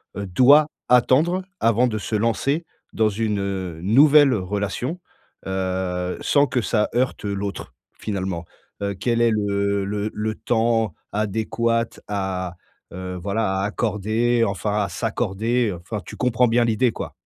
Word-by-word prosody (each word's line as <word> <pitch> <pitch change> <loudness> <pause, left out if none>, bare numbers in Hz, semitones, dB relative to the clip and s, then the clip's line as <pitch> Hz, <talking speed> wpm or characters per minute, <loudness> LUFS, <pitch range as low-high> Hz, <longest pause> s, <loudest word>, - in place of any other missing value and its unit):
doit 125 +10 +5 0.2
attendre 150 +9 +4 0.2
avant 115 +2 +3
de 110 -2 -2
se 110 - -3
lancer 140 +9 0 0.3
dans 110 -1 +2
une, 105 -1 -1
heu, 95 -4 -4
nouvelle 140 +5 +6
relation, 105 - -2 0.5
heu, 95 -1 -2
sans 145 0 +3
que 125 -1 0
ça 110 -1 0
heurte 125 -3 0
l'autre 100 0 -4 0.3
finalement. 95 -5 -3 0.6
Quel 120 -1 +1
est 115 -1 +4
le 100 -1 0
le 105 +2 -2
le 110 +1 -2
temps 115 -5 +1 0.2
adéquat 115 +3 0 0.2
à, 95 -3 -3 0.4
heu, 90 0 -6
voilà, 100 0 -1
à - - -1
accorder, 115 +2 0
enfin 100 +1 -2
à - - -2
s'accorder? 115 0 -1
Enfin 105 +4 -5
tu - - -9
comprends 125 0 +2
bien 120 +1 +3
l'idée 115 +1 +2
quoi. - - -6
110 Hz, 135 wpm, -22 LUFS, 100-120 Hz, 0.6 s, nouvelle